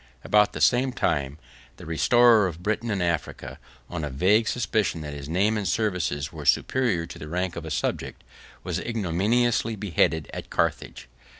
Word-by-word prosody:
About 105 0 +3
the 75 - -5
same 125 - +3
time, 70 - -1 0.4
the - - -11
restorer 110 +6 +4
of 85 0 -8
Britain 110 +3 -1
and 100 -4 0
Africa, 75 -4 -3 0.3
on 85 -3 -5
a 75 - -2
vague 100 - +2
suspicion 110 -8 0
that 75 -1 -6
his 70 0 -8
name 100 +6 +1
and 100 - -3
services 85 -9 -1
were - - -7
superior 120 -11 +1
to - - -11
the 75 - -8
rank 90 +2 -2
of 85 - -6
a - - -6
subject, 75 - -3 0.4
was - - -2
ignominiously 115 +3 0
beheaded 80 -5 0
at - - -7
Carthage. - - -2
90 Hz, 170 wpm, -25 LUFS, 80-110 Hz, 0.4 s, restorer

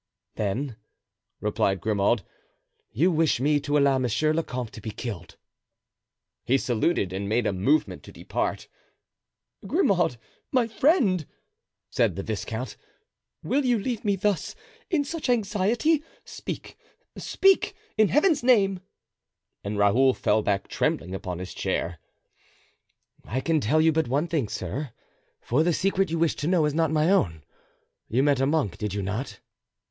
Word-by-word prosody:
"Then," 110 +4 -3 0.6
replied 95 -1 0
Grimaud, 105 +1 +1 0.7
"you 165 +12 +2
wish 160 -6 +2
me 145 +3 +2
to 145 +1 0
allow 140 -2 +3
monsieur 130 +5 +1
le 165 - +1
comte 125 -6 -5
to 110 - -9
be 110 - -5
killed." 105 -6 -7 1.1
He 130 +3 +3
saluted 120 - 0
and 100 +1 -3
made 115 +2 +1
a 105 - +1
movement 135 +12 +1
to - - -11
depart. - - -3 1.0
"Grimaud, 195 - +2 0.3
my 250 -3 +2
friend," 225 - +2 0.6
said - - +1
the 95 - -4
viscount, 110 +3 -4 0.7
"will 285 +2 +1
you 245 -2 +2
leave 235 +2 -3
me 205 -2 +2
thus, 195 -1 -1 0.3
in 325 -6 +2
such 315 -2 -4
anxiety? 230 - +1 0.2
Speak, - - -7 0.4
speak, 390 0 +2 0.2
in 215 -1 +4
Heaven's 305 - +3
name!" 200 -7 +3 0.8
And 100 +1 -3
Raoul 120 +6 +4
fell 110 +1 +2
back 100 -2 -1
trembling 90 +3 -1
upon 95 -2 -4
his 90 +1 -7
chair. 85 -1 -2 1.3
"I 125 - -2
can 160 +3 +1
tell 150 +8 +2
you 160 +1 +5
but 160 -2 0
one 140 +6 +1
thing, 155 -8 -1
sir, 120 - -4 0.5
for 125 +6 +1
the 170 +1 +2
secret 195 +2 +1
you 165 - -1
wish 165 -1 +2
to 145 - -2
know 175 -3 +3
is 150 - 0
not 160 0 +2
my 155 +3 +2
own. 80 - +1 0.6
You 125 +4 +1
met 140 -2 +2
a 135 - +2
monk, 145 - 0
did 105 -2 -3
you 100 - -2
not?" 105 +8 -4
145 Hz, 150 wpm, -26 LUFS, -, 1.3 s, you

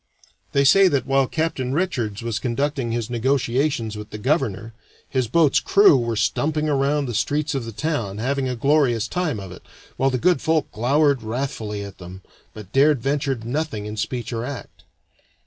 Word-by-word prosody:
They 140 - +3
say 195 +8 +6
that 140 -7 +1
while 135 -1 +2
Captain 155 -5 -2
Richards 120 - -2
was 115 -2 -2
conducting 130 0 -1
his 115 -1 -2
negotiations 125 -1 0
with 105 0 -8
the - - -7
governor 115 - -1 0.3
his 130 -3 -1
boat's 155 +4 +3
crew 200 -6 +5
were 120 -3 0
stumping 150 +7 0
around 145 0 +1
the 120 - -4
streets 150 +7 0
of 135 -4 -2
the 115 - -6
town, 115 -6 -3
having 130 +3 -1
a 125 - -2
glorious 125 -4 +2
time 165 - -2
of 95 -2 -8
it, 90 - -11 0.4
while 135 - +2
the 130 - -1
good 175 +3 +2
folk 160 -2 0
glowered 140 +4 +2
wrathfully 110 -3 -4
at 100 -2 -10
them, 90 +1 -10 0.3
but 105 -3 -10
dared 145 +1 +4
venture 140 +2 0
nothing 120 -1 -3
in 105 0 -5
speech 120 +2 -3
or 115 0 -2
act. 135 +1 -8
130 Hz, 180 wpm, -22 LUFS, 115-145 Hz, 0.4 s, say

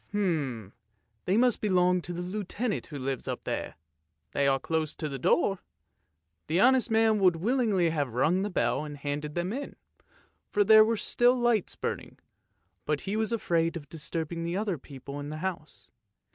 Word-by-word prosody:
" - - -35
They 125 - -3
must 245 -1 +3
belong 180 -3 +3
to 175 - -7
the 175 0 -4
Lieutenant 210 +4 -3
who 150 - -7
lives 135 -1 -3
up - - -4
there, - - -4 0.6
they 140 - +1
are 135 -1 +3
close 160 +1 -2
to 155 - -4
the 135 -2 -5
door." 180 +8 +2 0.9
The 165 +4 +1
honest 255 +3 +4
man 220 -1 +3
would 185 -3 +4
willingly 205 -3 +1
have 145 -7 -2
rung 165 +9 +2
the 205 - -1
bell 180 - 0
and 145 -1 -7
handed 145 +1 -4
them 175 +4 -1
in, 280 +3 -5 0.7
for 205 - +3
there 215 +1 +8
were 225 +1 +1
still 245 +4 +3
lights 240 -5 +1
burning, - - -5 0.7
but 150 -1 -1
he 200 - -3
was 220 +1 0
afraid 170 -6 0
of 145 -3 -11
disturbing 165 +1 -4
the 170 +2 -2
other 200 -6 -1
people 140 +1 -9
in 145 0 -6
the 155 - -5
house. 170 -2 -6
175 Hz, 175 wpm, -28 LUFS, 150-210 Hz, 0.9 s, there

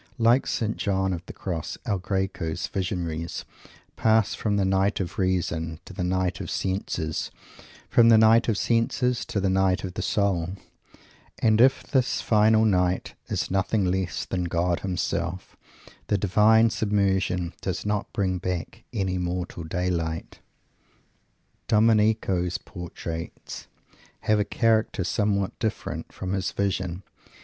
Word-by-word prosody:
Like 120 +2 +4
St. 110 -1 -1
John 95 -2 0
of 85 -1 -5
the - - -6
Cross, 85 -5 -4
El 100 -3 0
Greco's 95 -3 -2
visionaries 85 -3 -3 0.5
pass 110 -2 +3
from 105 -2 -1
the 100 - +2
Night 95 +2 +2
of 90 -3 -1
the 95 - -4
Reason 85 -3 -1
to - - -10
the 90 - -3
Night 90 -1 0
of - - -5
the - - -6
Senses; 90 -4 -2 0.6
from 115 -1 +5
the 115 - +8
Night 110 +2 +5
of 110 - +2
the - - -1
Senses 120 +1 +1
to 100 - -2
the 95 - +1
Night 95 -1 +2
of 90 -2 -5
Soul; 95 -4 0 0.8
and 110 0 +3
if 130 +2 +5
this 130 -3 +1
final 110 0 +4
Night 90 -3 +1
is - - -2
nothing 95 +2 +1
less 90 -3 -1
than 90 -1 -2
God 85 0 0
Himself, 90 -1 -3 0.5
the 105 - +2
divine 110 +4 +4
submersion 95 -5 0
does 95 0 -3
not 105 -1 -1
bring 95 -2 0
back 90 +5 -4
any 95 -5 -1
mortal 90 -1 -3
daylight. 85 -1 -2 1.3
Domenico's 105 -5 +3
portraits 85 -2 -7 0.5
have 105 0 +2
a 105 - +1
character 110 -4 +1
somewhat 100 +1 0
different 110 - -3
from 95 0 -4
his 95 -1 -1
visions. 95 -2 -2
95 Hz, 140 wpm, -26 LUFS, 90-105 Hz, 1.3 s, the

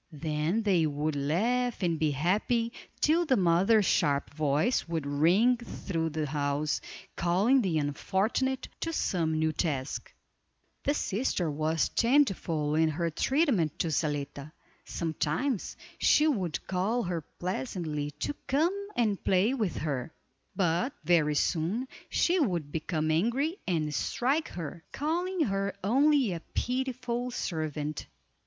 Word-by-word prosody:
Then 155 +7 -1
they 180 -6 +3
would 150 +1 -2
laugh 220 - 0
and 170 -3 +1
be 155 - +2
happy, 210 - 0 0.3
till 325 +3 +4
the 275 -6 +2
mother's 190 +4 +4
sharp 145 -6 +1
voice 150 - +1
would 165 -3 -2
ring 175 +13 +3
through 170 -8 -3
the 155 0 -2
house, 145 +1 -1 0.3
calling 195 +10 +3
the 180 -7 0
unfortunate 195 - 0
to 330 - -2
some 160 - 0
new 160 0 +2
task. 145 -4 -2 0.7
The 285 - +2
sister 195 - -1
was 155 +2 0
changeful 195 - +2
in 160 +1 +3
her 165 +2 -1
treatment 240 - +1
to 165 - -1
Zaletta. 145 -1 -2 0.3
Sometimes 165 - -2 0.2
she 300 - +5
would 190 - -1
call 200 +6 0
her 175 -2 -2
pleasantly 170 - -4
to - - -1
come 315 +7 +2 0.2
and 215 -5 0
play 190 +7 +3
with 215 -10 -1
her, 145 -2 -3 0.4
but 185 - +1
very 155 -2 +3
soon 180 - 0 0.2
she 360 +2 +2
would 175 - 0
become 155 0 -1
angry 245 - +1
and 155 -5 0
strike 275 - 0
her, 170 0 -7
calling 350 +5 -1
her 195 -6 0
"only 270 0 +3
a 170 - -4 0.2
pitiful 250 -1 -1
servant." 155 - -3
175 Hz, 130 wpm, -29 LUFS, 155-245 Hz, 0.7 s, she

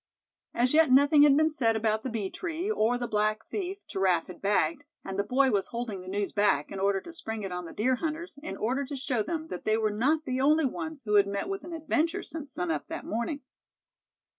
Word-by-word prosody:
As 250 +3 +2
yet 320 -2 +5
nothing 285 +3 +6
had 290 -1 +7
been 315 +1 +3
said 230 -7 +2
about 220 0 +1
the 260 - -4
bee 215 -5 -3
tree, 350 +3 -3
or 245 - +2
the 245 -1 -3
black 215 0 0
thief 395 0 -5
Giraffe 185 -3 +1
had 180 - -11
bagged; 210 +9 +1 0.2
and 195 0 -4
the - - +3
boy 260 +5 +3
was 200 -2 +1
holding 230 -5 -4
the 185 - -12
news 200 +1 -2
back, 205 -9 +2
in 195 - -5
order 195 0 +2
to 335 - -10
spring 220 -10 -5
it 195 - -4
on 180 0 -4
the - - -8
deer 250 +5 +1
hunters, 320 +1 -4
in 315 - -6
order 255 +6 0
to 280 +1 -6
show 260 -3 -1
them 320 +7 -4
that 180 - -6
they 215 0 +2
were 215 -1 +1
not 295 +9 +1
the 255 -2 -1
only 305 +2 +4
ones 315 +1 -4
who 210 -2 -2
had 200 -1 +5
met 200 - -3
with 390 0 -4
an 345 - -8
adventure 320 0 0
since 300 -4 -7
sun 180 -8 -2
up 155 - -3
that - - -6
morning. 235 +6 -2
245 Hz, 240 wpm, -28 LUFS, 205-310 Hz, 0.2 s, had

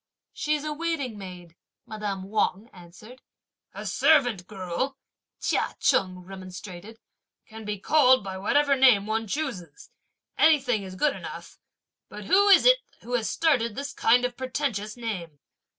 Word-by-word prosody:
"She's 300 -1 -1
a 305 0 -3
waiting 300 -7 -3
maid!" 180 -4 -10 0.3
madame 205 -3 -5
Wang 210 +2 -1
answered. 190 +8 -14 0.5
"A - - -8
servant 245 - +2
girl," 200 +7 -4 0.4
Chia - - -1
Cheng 185 -1 +1
remonstrated, 190 +2 -10 0.5
"can 220 0 -11
be 210 0 -3
called 260 +1 +4
by 190 -1 -6
whatever 285 +7 +2
name 250 -7 +5
one 220 +1 -2
chooses; 275 - -5 0.5
anything 265 -8 +4
is 190 -1 -8
good 280 +8 +1
enough; - - -9 0.5
but 210 0 -9
who's 400 - +5
it - - +6 0.2
who 245 - -8
has 230 -3 0
started 245 -9 +1
this 280 +2 -5
kind 245 +2 +3
of 250 -1 -3
pretentious 250 -5 -3
name!" 180 -11 -5
225 Hz, 135 wpm, -26 LUFS, 195-275 Hz, 0.5 s, it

